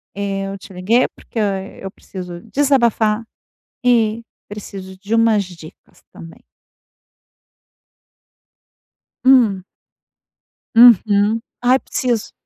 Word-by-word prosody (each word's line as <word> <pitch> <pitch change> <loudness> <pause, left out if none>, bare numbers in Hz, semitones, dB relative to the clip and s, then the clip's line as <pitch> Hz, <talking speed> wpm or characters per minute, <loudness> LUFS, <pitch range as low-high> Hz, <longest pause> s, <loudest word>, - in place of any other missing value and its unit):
eh, 195 -1 -3
eu 195 0 -6
te 195 0 -14
liguei 215 +8 +2
porque - - -14
eu 195 -1 -3
preciso 180 -3 -9
desabafar 235 -6 +2 0.6
e 230 -2 +2 0.2
preciso 195 -2 -9
de 205 +3 -5
umas 225 -3 +3
dicas 170 -4 -15
também. 165 0 -14 2.8
Hum. 230 -8 +4 1.1
Uhum. 220 -2 +5 0.2
Ai, 255 +2 +3
preciso. 240 -4 -2
210 Hz, 85 wpm, -18 LUFS, 195-235 Hz, 2.8 s, Uhum